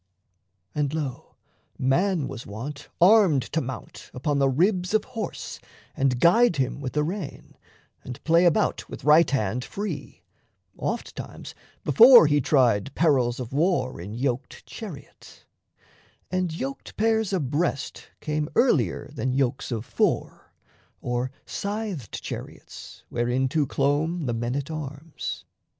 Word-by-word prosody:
And, 150 0 -1
lo, 140 -6 -5 0.4
man 155 +4 +1
was 115 - -8
wont 135 +8 -7
Armed 180 - +6
to 160 - +2
mount 130 0 -8
upon 140 +3 0
the 135 -1 +4
ribs 180 +7 +1
of 215 - +3
horse 225 -5 -6 0.4
And 130 -2 +1
guide 200 - +5
him 135 0 -1
with 130 -2 -4
the 150 - +1
rein, 175 -1 -6 0.5
and 125 -1 -8
play 170 +2 +4
about 170 - +1
With - - -9
right 155 +3 +6
hand 125 -2 -1
free, 205 +7 -6 0.5
oft - - -4
times - - -8 0.3
before 240 -4 +9
he 145 -1 +3
tried 125 -4 +2
Perils 130 -7 +2
of 125 0 -6
war 155 - +1
in 100 +5 -7
yoked 125 +1 -3
chariot; - - -11 0.9
And 185 -2 0
yoked 135 -4 -6
pairs 220 -1 +2
abreast 150 -3 -2
came 150 0 -2
earlier 145 - +2
Than 130 0 -2
yokes 130 -1 -1
of 115 -1 -3
four, - - -1 0.5
or 125 +1 -2 0.2
scythed 200 - -4
chariots - - -9
Whereinto 130 +5 0
clomb 150 +5 0
the 120 - -1
men 120 +2 -2
at 140 +2 -3
arms. 150 0 -6
145 Hz, 130 wpm, -25 LUFS, 130-175 Hz, 0.9 s, before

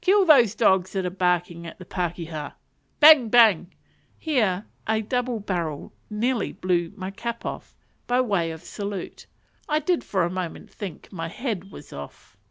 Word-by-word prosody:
kill 390 +1 +5
those 245 - +6
dogs 190 -4 +3
that 190 -2 -1
are 180 - -2
barking 175 -2 0
at - - -10
the 180 - -11
pakeha!" 165 -4 -4 0.5
Bang! 295 -6 +8
bang! 215 -7 +5 0.5
Here 215 - 0 0.2
a 220 0 +1
double 245 +1 -1
barrel 170 -7 -4 0.2
nearly 225 +1 -1
blew 175 -2 0
my 190 -2 -5
cap 235 +3 -5
off, - - -6 0.3
by 245 +1 +2
way 200 -9 +1
of 160 -1 -8
salute: 200 -2 -6 0.4
I 300 - +2
did 325 +3 0
for 190 -3 0
a 175 - -1
moment 185 +3 -5
think 195 -4 -8
my 165 -2 -4
head 195 -1 -4
was 150 - -12
off. 70 0 -10
195 Hz, 165 wpm, -25 LUFS, 175-235 Hz, 0.5 s, Bang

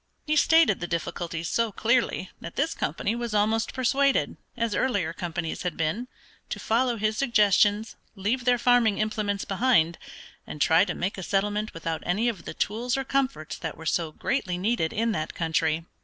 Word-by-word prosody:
He 305 0 +1
stated 320 - +5
the 175 - -4
difficulties 170 0 -3
so 230 +2 0
clearly 230 -3 0
that 170 - -8
this 300 +4 0
company 170 +8 -2
was 235 -2 -3
almost 220 +2 +1
persuaded, 270 +2 +2 0.2
as 230 -2 0
earlier 200 -11 0
companies 170 -1 -4
had 180 -3 -3
been, 165 +10 -1 0.4
to - - -4
follow 240 +1 +1
his 215 0 0
suggestions, 210 -3 +3 0.2
leave 225 +6 -1
their 250 -1 +4
farming 240 -4 +3
implements 215 -2 -1
behind, 195 -6 +2 0.5
and 150 - -7
try 160 +5 +5
to - - -3
make 190 +2 -3
a - - -4
settlement 205 +3 -1
without 165 -1 -3
any 205 +7 0
of 195 -8 -6
the - - -6
tools 240 +5 -1
or 270 - -1
comforts 265 - -2
that 160 - -5
were 160 - -10
so 160 0 0
greatly 185 - -2
needed 185 -4 0
in 230 +2 0
that 155 -7 -3
country. 160 -1 0
210 Hz, 175 wpm, -26 LUFS, 170-240 Hz, 0.5 s, stated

